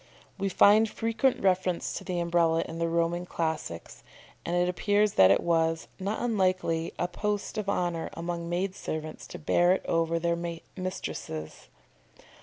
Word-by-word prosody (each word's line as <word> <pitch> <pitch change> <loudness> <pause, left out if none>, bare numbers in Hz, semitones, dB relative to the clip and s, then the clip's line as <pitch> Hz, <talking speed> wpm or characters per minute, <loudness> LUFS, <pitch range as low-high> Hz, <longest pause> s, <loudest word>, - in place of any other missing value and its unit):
We 195 0 0
find 210 +3 +5
frequent 230 +4 0
reference 185 -2 +1
to - - -5
the 180 -3 -2
Umbrella 170 -1 +2
in 165 - -7
the 170 0 0
Roman 170 +1 0
Classics, 160 - -4 0.4
and 170 - -2
it 175 0 +2
appears 205 +3 +2
that 95 -1 +7
it 100 - +4
was, 165 -1 +1
not 200 +5 -2
unlikely, 185 -7 +1
a 175 - 0
post 205 +3 -3
of 200 -2 -3
honour 175 -4 -1
among 170 0 -4
maid 185 +2 -1
servants 155 -4 -6
to - - -8
bear 175 +3 +3
it 190 - -3
over 165 0 +1
their 170 0 -1 0.2
mistresses. 80 - -5
175 Hz, 155 wpm, -28 LUFS, 165-190 Hz, 0.4 s, that